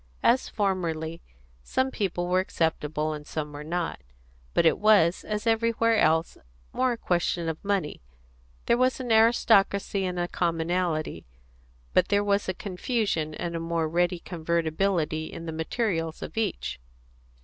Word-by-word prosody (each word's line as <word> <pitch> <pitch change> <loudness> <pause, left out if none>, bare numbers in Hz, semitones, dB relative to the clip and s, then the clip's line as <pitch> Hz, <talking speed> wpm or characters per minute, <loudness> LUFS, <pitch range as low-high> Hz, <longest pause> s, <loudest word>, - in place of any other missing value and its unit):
As 250 +2 +3
formerly, 170 -5 -2 0.4
some 260 - 0
people 180 -6 -2
were 180 +1 +3
acceptable, 155 -4 -1
and 150 0 -8
some 150 -2 -4
were 145 +1 -7
not; 170 +2 -3 0.5
but - - +4
it 160 - +4
was, 205 -5 +4
as 210 +1 -3
everywhere 230 0 +2
else, 160 -2 +2 0.3
more 255 -1 +2
a - - -6
question 175 -3 0
of 160 -1 -4
money; 200 - -1 0.6
there 235 - +3
was 255 +1 +2
an 250 -2 -3
aristocracy 220 -3 +4
and 180 -1 -3
a 175 0 0
commonalty, 170 - -1 0.7
but - - +4
there 205 0 +2
was 200 -1 +1
a 185 - -1
confusion 185 -5 -2
and 170 +1 -4
a - - -1
more 165 -1 -1
ready 175 +2 +1
convertibility 165 -1 -1
in 165 - -8
the 165 - -4
materials 165 0 -2
of - - -8
each. 220 - -2
175 Hz, 150 wpm, -27 LUFS, 160-205 Hz, 0.7 s, but